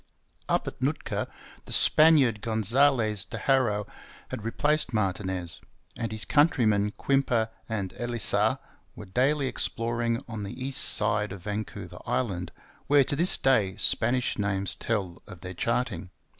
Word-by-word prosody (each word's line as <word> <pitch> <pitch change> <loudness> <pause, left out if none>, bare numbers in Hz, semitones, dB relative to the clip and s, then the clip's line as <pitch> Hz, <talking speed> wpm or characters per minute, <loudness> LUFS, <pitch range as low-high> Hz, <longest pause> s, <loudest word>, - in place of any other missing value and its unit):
Up - - +1
at - - -7
Nootka - - -2 0.4
the - - -11
Spaniard 145 -9 +4
Gonzales 110 -1 +2
de - - -7
Haro 115 -7 +1 0.4
had 110 - -6
replaced 140 +2 0
Martinez; 95 -4 -2 0.3
and 115 -2 -4
his 110 0 -5
countrymen 110 -9 +3
Quimper 120 -2 0 0.2
and 100 -4 -3
Elisa 120 -3 +1 0.4
were 105 - -9
daily 135 +9 +1
exploring 115 -2 -1
on 110 -3 -6
the 100 +5 -7
east 130 +1 +2
side 105 -1 +3
of 95 -3 -9
Vancouver 105 0 -6
Island, 90 -8 -2 0.4
where 145 -1 +5
to 140 - -2
this 170 +5 +4
day 105 -8 +2
Spanish 120 0 0
names 100 -1 +1
tell 95 -6 -3
of 90 - -11
their 90 0 -7
charting. 100 -3 -2
110 Hz, 135 wpm, -27 LUFS, 100-130 Hz, 0.4 s, where